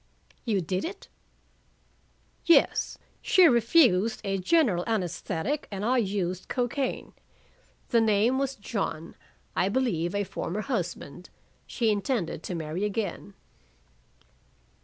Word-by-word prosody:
"You 210 -5 +1
did 185 +3 -2
it?" 390 +4 -7 1.3
"Yes. 340 - +3 0.2
She 370 -2 +5
refused 235 - +4
a 195 -1 -1
general 195 - +2
anesthetic 200 - -2
and 200 0 -4
I 250 +2 +3
used 190 -4 -2
cocaine. 250 +1 -2 0.8
The 230 -2 +4
name 225 +4 +3
was 275 -1 -1
John 195 -7 -4 0.4
I 190 - +2
believe 200 -7 0
a 205 - +1
former 195 +1 -4
husband. 180 - -4 0.4
She 230 -3 +1
intended 200 - -1
to 180 - -5
marry 160 +3 -3
again." 205 -1 -3
205 Hz, 110 wpm, -27 LUFS, 185-245 Hz, 1.3 s, She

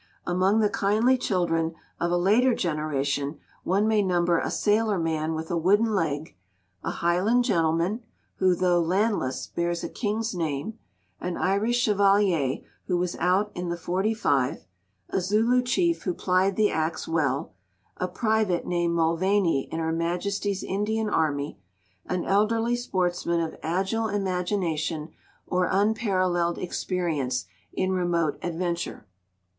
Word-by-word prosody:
Among 190 +5 +2
the 210 - +3
kindly 215 +7 +3
children 170 -8 0 0.2
of 170 - 0
a 175 - +2
later 225 +8 +3
generation 145 -3 -1 0.3
one 200 +4 +2
may 220 -1 +3
number 175 -3 +2
a - - -2
sailor 210 -1 +1
man 160 -1 -1
with 160 +2 -5
a 175 - +1
wooden 205 +6 +3
leg; 160 -5 -1 0.5
a - - -2
Highland 185 +8 +2
gentleman, 170 +1 +1 0.4
who, 185 -1 +3
though 180 -1 +2
landless, 185 - 0
bears 170 0 -2
a - - -3
king's 220 0 -2
name; 165 +5 -3 0.4
an 180 -1 -3
Irish 200 +5 +1
chevalier 195 - +2 0.3
who 180 - +1
was 180 0 -1
out 190 +4 +2
in 175 0 -4
the 170 - -2
'45; 175 - 0 0.5
a 190 - +1
Zulu 220 +7 +3
chief 335 +7 +1
who 180 -3 -2
plied 185 +1 +1
the 215 -1 +3
axe 160 +1 -2
well; 155 - 0 0.4
a 180 - -1
private 215 -3 0
named 175 -1 0
Mulvaney 170 -1 +1
in 160 - -3
Her 160 0 -1
Majesty's 190 +4 -1
Indian 210 +2 -1
army; 145 -7 0 0.5
an 180 -1 -2
elderly 225 +4 +2
sportsman 180 -7 -1
of 165 -1 -2
agile 195 +7 0
imagination 180 -5 -1 0.4
or 180 0 0
unparalleled 185 -4 +1
experience 165 -8 -2 0.3
in 185 0 -1
remote 175 -4 0
adventure. 175 -5 -3
180 Hz, 135 wpm, -26 LUFS, 165-205 Hz, 0.5 s, the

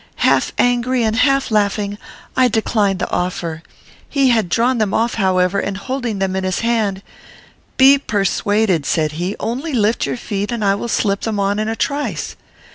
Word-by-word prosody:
"Half - - +3
angry, 245 0 +1
and 220 0 +1
half 275 +1 +2
laughing, 205 -1 0 0.4
I 255 0 +4
declined 215 -3 +1
the - - -4
offer. 170 -3 -2 0.5
He 275 -2 +2
had 220 -6 +1
drawn 240 +5 +1
them 210 -3 0
off, 230 +1 +1
however, 185 -1 +1
and, 195 -1 -3
holding 245 0 -3
them 190 -1 -1
in 190 - -1
his 185 -1 -1
hand, 215 -4 0 0.7
'Be 275 +1 +7
persuaded,' 205 - 0
said 155 -3 +1
he; 175 +6 -3
'only 270 +7 -3
lift 220 -1 +1
your - - -3
feet, 205 -1 -3
and 230 -3 -2
I 195 - +4
will 200 +4 -3
slip 200 -3 0
them 220 -2 -2
on 200 +1 0
in 215 - -1
a 225 - -2
trice.' 285 +5 -3
215 Hz, 180 wpm, -18 LUFS, 195-240 Hz, 0.7 s, Be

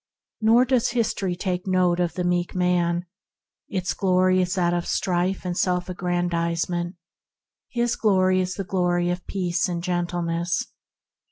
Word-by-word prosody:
Nor 230 +3 +5
does 255 -2 +2
history 215 -6 -1
take 180 0 -3
note 180 -2 +2
of 170 -2 0
the 180 - -1
meek 175 0 0
man. 175 -1 +1 0.6
Its 185 -2 -1
glory 185 -1 +3
is 180 0 -1
that 175 -2 +2
of 175 0 -1
strife 185 +1 0
and 180 -1 -2
self 180 0 0
aggrandisement; 175 0 -1 0.7
his 240 0 0
is 185 -2 +3
the 195 - -4
glory 175 -2 +1
of 180 0 -5
peace 180 -2 -1
and 170 -1 -3
gentleness. 175 -1 -1
180 Hz, 140 wpm, -24 LUFS, 175-185 Hz, 0.7 s, Nor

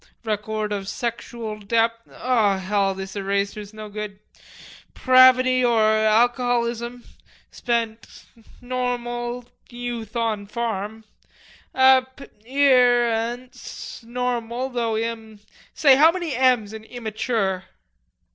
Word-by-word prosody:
record 215 -1 -3
of 200 -1 -3
sexual 230 -1 -5
dep.... 230 +2 0
O 225 -6 +1
hell, 195 0 0
this 190 +1 -7
eraser's 200 +1 -2
no 215 -1 -9
good!... 210 -1 -6 0.8
pravity 255 0 +5
or 235 -2 +3
alcoholism; 235 +2 +1 0.5
spent... 230 -2 -3 0.3
normal... 245 -1 -3 0.2
youth 240 -2 -6
on 220 -3 -1
farm. 220 -1 -4 0.7
App 260 0 +4 0.3
ear 250 -3 +4
ance 240 +4 -6
normal 245 +1 -3
though 230 -3 -1
im... 225 -1 -5 0.4
say, 275 -4 +6
how 315 +3 +7
many 345 -5 -4
'm's' 245 -5 +2
in 220 0 -8
immature?" 220 -5 -2
235 Hz, 100 wpm, -23 LUFS, 215-245 Hz, 0.8 s, how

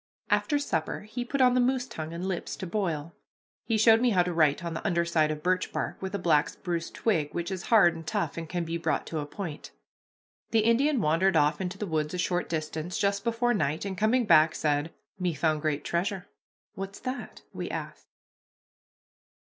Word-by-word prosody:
After 295 - +2
supper 165 - -2
he 220 +4 -5
put 265 +2 -1
on 250 -1 +6
the 250 - +3
moose 250 0 +2
tongue 155 -6 -6
and 170 +2 -5
lips 185 -3 -3
to - - -6
boil. 170 -5 -2 0.5
He 225 - +1
showed 225 +1 +6
me 250 - +4
how 185 -5 +4
to 180 0 -3
write 155 -2 +3
on 170 - -3
the 160 - -5
under 170 -4 +1
side 160 -2 +2
of 150 0 -4
birch 185 +1 +1
bark - - -3
with 190 +1 -4
a - - +1
black 165 -5 +3
spruce 170 -2 -4
twig, 160 -10 -1
which 170 +2 -2
is 185 -2 -4
hard 200 -7 +6
and 165 -1 -9
tough 210 -2 -1
and 165 -2 -6
can 175 -2 -2
be 165 +1 -3
brought - - -1
to 160 - -4
a 145 - -4
point. 165 -2 -6 0.8
The 225 - +3
Indian 245 +4 +3
wandered 170 +3 +2
off 150 +2 +2
into 185 +1 -3
the 210 - -3
woods 155 -2 -1
a - - -3
short 175 0 -1
distance 160 +1 -3
just 200 0 0
before 235 +1 +1
night, 160 -5 -1
and, 195 -1 -3
coming 225 +5 +2
back, 155 -4 +5
said, 150 +1 0 0.3
"Me 180 -3 0
found 155 +1 +1
great 150 -1 -1
treasure." 185 +2 -2 0.5
"What's 195 +1 -6
that?" 255 +1 -6
we - - -4
asked. - - -6
180 Hz, 205 wpm, -28 LUFS, 160-215 Hz, 0.8 s, on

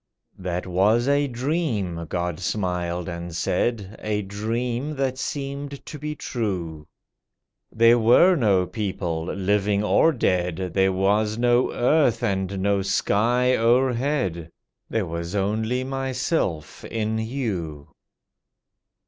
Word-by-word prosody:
"That 90 -1 -3
was 105 +7 +2
a 145 0 +3
dream," 120 - -2
God 85 -2 -2
smiled 90 -3 -2
and 85 -1 -6
said— 100 +3 -1
"A 105 -1 -1
dream 120 +8 -3
that 135 -1 -1
seemed 140 0 -5
to 150 - -8
be 150 +1 -4
true. 90 - -4 0.8
There 115 +1 +5
were 125 +12 +6
no 100 - +3
people, 90 -5 -3
living 100 +2 0
or 160 +9 +4
dead, 90 - -1
There 95 0 +3
was 105 +3 +1
no 120 +1 +3
earth, 125 -2 +2
and 95 0 -1
no 100 -1 +2
sky 115 +6 +2
o'erhead; 120 - +1 0.4
There 110 -3 0
was 85 +2 -5
only 110 +5 0
Myself—in 115 - -2
you." 100 - -4
105 Hz, 110 wpm, -24 LUFS, 90-125 Hz, 0.8 s, were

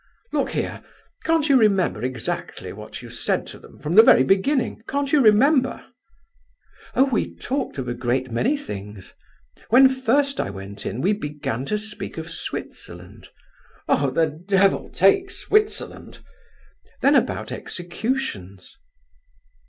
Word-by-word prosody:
Look - - 0
here, - - -3 0.4
can't 325 -2 +2
you 280 - +4
remember 195 - +2
exactly 125 -3 -4
what - - -9
you - - -10
said - - -1
to - - -10
them, - - -16
from 150 - -4
the 215 - +10
very 175 - +6
beginning? 225 - +1
Can't 280 0 -2
you 295 - +6
remember?" 260 +5 +3 1.1
"Oh, 265 - +5
we 265 -5 -1
talked 270 - -3
of 130 -2 -4
a 120 - -2
great 125 +1 -2
many 245 - +1
things. 100 - -8 0.6
When 260 +4 +8
first 265 +2 +1
I - - -1
went 100 +1 -7
in 125 - -4
we 195 +7 +2
began 145 - -4
to 210 - -1
speak 210 -4 -7
of 160 0 -6
Switzerland." - - -8 0.6
"Oh, 140 -1 +2
the 160 +5 +2
devil 190 +6 +1
take 195 - +3
Switzerland!" 425 +3 -1 0.8
"Then - - +5
about - - +1
executions." 175 - -4
195 Hz, 135 wpm, -23 LUFS, -, 1.1 s, the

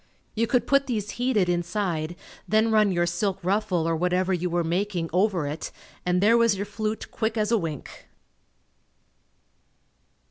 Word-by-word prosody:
You 230 +1 0
could 245 +1 +2
put 275 0 +3
these 210 -5 -2
heated, 235 -7 +2
inside 175 -2 -1 0.3
then 220 +1 +3
run 215 -2 +4
your 175 -1 +1
silk 180 +3 -1
ruffle 185 -3 +1
or 165 - +1
whatever 180 +3 +1
you 180 0 -1
were 175 0 0
making 175 0 -1
over 185 -3 +2
it 150 +3 -5 0.4
and 180 0 +2
there 230 +3 +5
was 230 -3 +4
your 200 - -2
flute 215 +1 -4
quick 220 0 -2
as 210 0 0
a 230 - +4
wink. 160 -6 -7
195 Hz, 155 wpm, -25 LUFS, 175-215 Hz, 0.4 s, there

